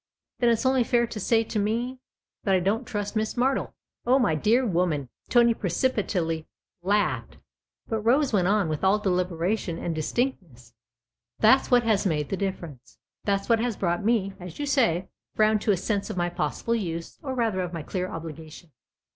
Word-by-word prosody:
" - - -59
Then 240 - +4
it's 230 +2 +1
only 260 -1 +4
fair 235 0 +2
to 230 -2 -7
say 225 +3 +2
to 215 -1 -3
me? 235 +5 -1
" - - -67
" - - -66
That 195 -2 +3
I - - +3
don't 215 +7 -1
trust 205 0 -4
Miss 215 0 -1
Martle." 260 +2 0 0.2
" - - -50
Oh, 255 +2 +5
my 245 -12 +2
dear 220 - +2
woman! 170 - 0
" - - -38
Tony 235 -1 +5
precipitately 180 -6 -1 0.3
laughed. 205 +3 0 0.5
But 225 - -1
Rose 255 +4 +2
went 185 -4 +3
on 200 -2 +2
with 155 +1 -3
all 190 +2 +4
deliberation 180 -1 -1
and 170 - -3
dis 155 -1 -3
tinctness. 165 - -3 0.3
" 120 0 -57
That's 260 +5 +5
what 245 -1 +5
has 215 -3 +2
made 150 -4 -1
the - - -1
difference 175 -9 -6 0.3
that's 200 -1 0
what 230 -1 +3
has 235 -2 -1
brought 175 +1 -1
me, 205 -3 +1
as 180 -1 -9
you 290 - -2
say, 230 - +2 0.3
round 215 -1 +3
to 215 - +2
a 195 - +2
sense 200 +2 -2
of 210 - -5
my 175 0 +1
possible 175 +8 -2
use, 170 -7 -4
or 265 -2 -4
rather 225 -6 0
of 180 -1 -3
my 165 -3 -5
clear 185 +3 -3
obligation. 160 0 -9
200 Hz, 205 wpm, -26 LUFS, 175-230 Hz, 0.5 s, Oh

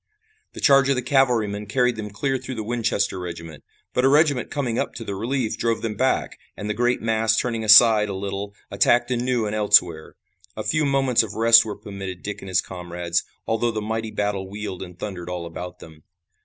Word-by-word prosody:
The - - -9
charge 140 -2 +4
of 140 - +3
the 125 - -2
cavalrymen 115 -6 +1
carried 125 +3 +1
them 105 -1 -6
clear 130 +6 -2
through 130 - -7
the 110 - -4
Winchester 110 -4 -1
regiment, 85 -3 -8 0.3
but 125 - +1
a - - +5
regiment 145 -3 +3
coming 125 -5 -2
up - - -3
to 115 - -6
the 100 - -5
relief 115 +2 -2
drove 115 0 -1
them 115 -2 -2
back, 130 +5 -1 0.2
and 105 - -5
the 105 - -1
great 120 +2 0
mass 110 0 +1
turning 115 -2 -1
aside 110 -1 +7
a 100 - -4
little 100 +1 -5 0.2
attacked 120 +5 +2
anew 125 -1 0
and 105 - -3
elsewhere. 90 -6 +2 0.4
A 110 - -3
few 155 +4 0
moments 135 -3 +2
of 110 -2 -6
rest 115 0 +6
were 105 - -5
permitted 95 -3 -8
Dick 105 0 -6
and 95 - -9
his 90 - +2
comrades, 85 -2 -3 0.2
although 115 +1 0
the 110 -2 -3
mighty 110 +1 -3
battle 100 -3 -3
wheeled 105 -2 -6
and 90 -2 -9
thundered 90 -3 -6
all 90 -1 -4
about 90 +1 -8
them. 80 -2 -14
110 Hz, 205 wpm, -23 LUFS, 95-120 Hz, 0.4 s, aside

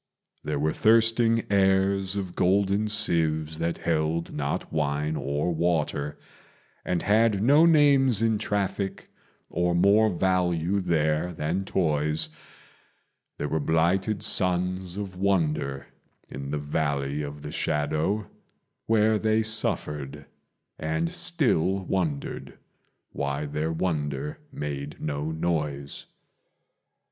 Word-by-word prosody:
There 75 -1 -2
were 75 +2 0
thirsting 115 +1 +3
heirs 95 0 +2
of 95 -3 -4
golden 100 +3 +2
sieves 80 -7 0
that 85 0 -1
held 80 0 -1
not 70 +1 -3
wine 75 0 0
or 75 +4 -1
water, 80 -3 -1 0.7
And 90 -2 -1
had 105 -1 +3
no 145 +7 +6
names 140 -7 +5
in 110 -2 +1
traffic 100 -1 -2 0.4
or 85 0 0
more 100 +5 +4
value 90 0 +1
there 80 -1 0
than 85 +5 -2
toys: 75 -4 0 1.1
There 75 - -2
were 80 - -1
blighted 90 +6 +1
sons 90 0 0
of 95 -3 -5
wonder 80 -8 0 0.4
in 70 0 -6
the 75 - -1
Valley 70 -1 -1
of 75 0 -7
the 75 - -6
Shadow, 80 +9 0 0.6
Where 110 -1 +3
they 110 +1 +2
suffered 75 -10 -2 0.5
and 80 +1 -1
still 95 - +1
wondered 80 -8 -3 0.5
why 70 +1 -2
their 75 +2 -2
wonder 75 -4 -2
made 70 0 -5
no 75 0 -3
noise. 75 -4 -3
85 Hz, 110 wpm, -26 LUFS, 75-100 Hz, 1.1 s, no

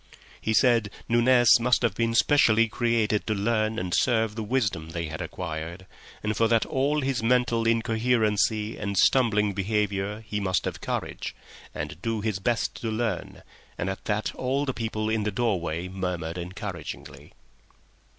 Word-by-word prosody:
He 110 - 0
said 115 -4 +4 0.2
Nunez 120 0 +5
must 125 +1 +2
have 115 -5 +2
been 115 +2 0
specially 115 -5 +4
created 115 -2 0
to 110 - +1
learn 110 +1 0
and 90 -5 -3
serve 110 -3 +2
the 110 - -5
wisdom 105 -9 -1
they 85 0 -3
had 80 - -6
acquired, 85 +1 -5 0.4
and 105 0 0
that 115 +1 +3
for - - -10
all 145 +3 +1
his 130 -4 -1
mental 115 -1 +2
incoherency 110 -2 +1
and 100 -1 -3
stumbling 105 -5 +3
behaviour 105 +1 -1
he 105 - -2
must 95 -2 0
have - - -4
courage - - -4 0.4
and 80 - -5
do 115 -1 -1
his 105 -2 -1
best 115 +3 0
to 115 - -2
learn, 110 -4 -3 0.3
and 95 +3 -1
at 95 - -8
that 105 0 -1
all 135 +3 -1
the 130 - -2
people 110 -2 -3
in 110 0 0
the 105 - 0
door 110 -2 0
way 85 +1 -3
murmured 90 -3 -3
encouragingly. 85 -6 -7
110 Hz, 160 wpm, -26 LUFS, 95-115 Hz, 0.4 s, Nunez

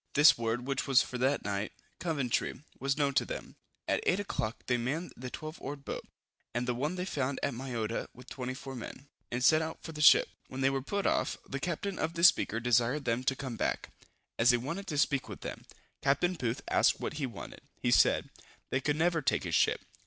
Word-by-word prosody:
This 150 +2 +8
word, 115 +1 -2
which 135 +1 -1
was 135 -2 +6
for 125 - -6
that 135 +3 +2
night, 100 +1 -2 0.3
Coventry, 140 -5 -1 0.2
was 135 +1 0
known 140 -2 +2
to - - +3
them. - - -7 0.3
At - - +2
8 190 +3 +3
o'clock 115 - -3
they 125 - +2
manned 140 +9 -2
the 125 +1 -6
twelve 155 +4 -7
oared 140 0 -6
boat, - - -4 0.5
and 120 +1 -1
the 125 - +1
one 145 +8 -1
they 180 0 -2
found 140 -6 -1
at 140 - +1
Mayotta, 115 -3 -3
with 125 +1 -15
24 130 +1 -5
men, 135 +3 -8 0.2
and 120 +1 -1
set 155 +4 +6
out 160 0 -5
for 160 - -6
the 150 -1 -6
ship. 150 - +8 0.2
When 130 - -6
they 135 0 +4
were 135 -1 -1
put 200 +9 -2
off, - - +1
the 135 - -4
captain 180 +4 -3
of 165 +2 -1
the 170 - -2
Speaker 115 -9 +5
desired 125 +4 +2
them 120 +1 0
to 135 - +2
come 130 -4 -5
back, - - -1 0.5
as 115 +2 +5
he 125 - +6
wanted 165 +11 -5
to 150 - -2
speak 140 -2 +1
with - - -8
them. - - -6 0.4
Capt. 170 +6 +2
Booth 120 +1 -2
asked - - +3
what - - -3
he 140 - 0
wanted! 115 -5 -9 0.2
He - - +1
said, - - +4 0.4
"they 130 - +1
could 150 0 +1
never 165 +1 +2
take 135 - +1
his - - -4
ship." - - +3
135 Hz, 220 wpm, -31 LUFS, 125-155 Hz, 0.5 s, This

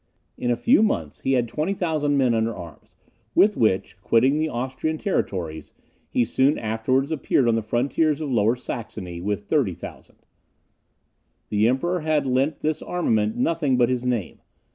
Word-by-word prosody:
In 120 - -3
a 120 - +3
few 235 - +4
months 80 - -1
he 135 - +1
had 125 -2 +2
20,000 155 - -1
men 130 -3 +3
under 115 0 0
arms, 85 -4 -12 0.4
with 210 0 +5
which, 95 -2 0
quitting 130 +8 +3
the 155 0 0
Austrian 130 +5 -3
territories, 85 - -3 0.3
he 120 - +1
soon 130 +5 +2
afterwards 125 +6 0
appeared 135 -4 +1
on 115 - +3
the 115 - +1
frontiers 140 +7 0
of 150 -3 -3
Lower 115 0 +3
Saxony 105 -8 -6
with 105 +2 -2
30,000. 105 - -3 1.3
The 105 +1 +2
Emperor 170 +9 0
had 155 -2 0
lent 135 +4 0
this 155 0 -1
armament 110 -12 0
nothing 145 -1 +1
but 120 -1 +3
his 125 -1 -1
name. 120 -7 -2
125 Hz, 155 wpm, -23 LUFS, 110-150 Hz, 1.3 s, with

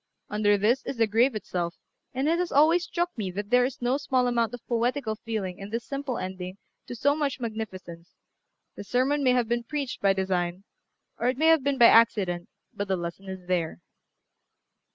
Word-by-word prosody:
Under 210 -1 +3
this 220 +6 +2
is 270 - -5
the 230 - +4
grave 230 +4 +2
itself; 175 -4 -3 0.4
and 265 +2 -1
it 335 +2 +2
has 355 -1 -1
always 320 +5 +4
struck 345 +2 -2
me 210 -6 -3
that 205 +3 -5
there 245 0 +5
is 250 -1 -5
no 250 +3 +2
small 260 -3 +1
amount 235 -3 +1
of 245 -1 -9
poetical 240 0 0
feeling 210 -5 -4
in 195 +1 -7
this 230 +2 -4
simple 275 -3 -3
ending 185 0 -6 0.3
to 245 - -6
so 285 +5 +2
much 290 -4 -1
magnificence; 190 -7 -6 0.6
the - - -7
sermon 265 +6 +1
may 255 -1 +4
have 245 -2 +1
been 240 +1 -1
preached 280 +1 -4
by 195 -1 +4
design, 185 -1 -1 0.6
or 240 - 0
it 255 0 +1
may 320 +3 +4
have 325 -4 +5
been 280 0 0
by 240 - +7
accident, 200 -7 +4 0.2
but 205 - -4
the 190 -1 0
lesson 175 +3 -6
is 190 -1 -7
there. 170 - -1
230 Hz, 195 wpm, -27 LUFS, 195-265 Hz, 0.6 s, by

